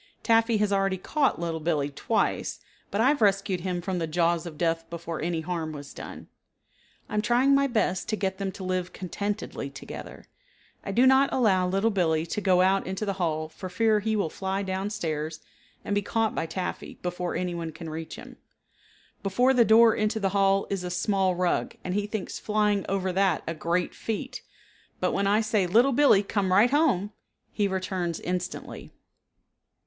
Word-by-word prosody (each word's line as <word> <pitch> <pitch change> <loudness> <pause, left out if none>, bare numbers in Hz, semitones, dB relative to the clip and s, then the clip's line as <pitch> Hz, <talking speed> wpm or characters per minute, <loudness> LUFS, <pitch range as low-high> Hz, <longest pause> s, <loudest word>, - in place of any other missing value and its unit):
Taffy 225 0 +3
has 205 -1 +1
already 195 -1 +1
caught 275 - 0
Little 165 -1 -2
Billee 150 -3 0
twice, 140 - -1 0.3
but 200 - -2
I 255 - +5
have 285 -3 +1
rescued 195 -2 +2
him 180 -1 -2
from 185 -1 -2
the 165 - -1
jaws 170 +1 +1
of 155 -3 -9
death 165 0 -1
before 170 -1 -5
any 165 0 -1
harm 160 -2 -3
was 145 -1 -9
done. - - -9 0.8
I - - -10
am 210 - +2
trying 245 +5 +3
my 275 0 +4
best 215 -6 0
to 215 - +1
get 190 -2 -2
them 195 -1 -2
to 190 - -8
live 185 -1 -2
contentedly 200 -5 -4
together. 140 - -9 0.6
I - - -4
do 240 +6 +4
not 265 +1 +5
allow 190 -7 +3
Little 195 +5 +1
Billee 165 -5 +1
to 190 +5 -3
go 185 -2 +4
out 190 +1 +2
into 190 +3 -3
the 200 - -1
hall 155 -2 0
for 185 +4 -8
fear 215 +3 +2
he 220 +1 -1
will 195 -7 0
fly 195 +1 -2
down 190 +1 -2
stairs 155 -5 -3 0.5
and - - -1
be 205 - +2
caught 225 +2 0
by 165 - -2
Taffy 180 +3 -5
before 180 0 -3
anyone 170 -2 -3
can 160 +1 -9
reach 160 +1 -6
him. - - -11 0.8
Before 245 +7 +2
the 245 -2 +5
door 225 0 +6
into 215 +1 0
the 195 -2 +1
hall 195 0 +2
is 195 -2 -2
a 180 - -3
small 190 0 +1
rug 180 0 0
and 180 - -3
he 205 +1 -1
thinks 210 -2 -4
flying 210 -2 +1
over 190 -1 -1
that 190 -3 +2
a 165 - -2
great 170 +2 -1
feat, 220 -2 -4 0.6
but - - +1
when 200 0 0
I 210 +2 +3
say, 215 -4 +1
"Little 235 +9 +4
Billee, 255 -7 +5
come 200 -2 -1
right 210 +7 +5
home," 260 - +2 0.4
he 205 -2 +1
returns 185 -3 -2
instantly. 180 0 -5
190 Hz, 190 wpm, -27 LUFS, 175-210 Hz, 0.8 s, door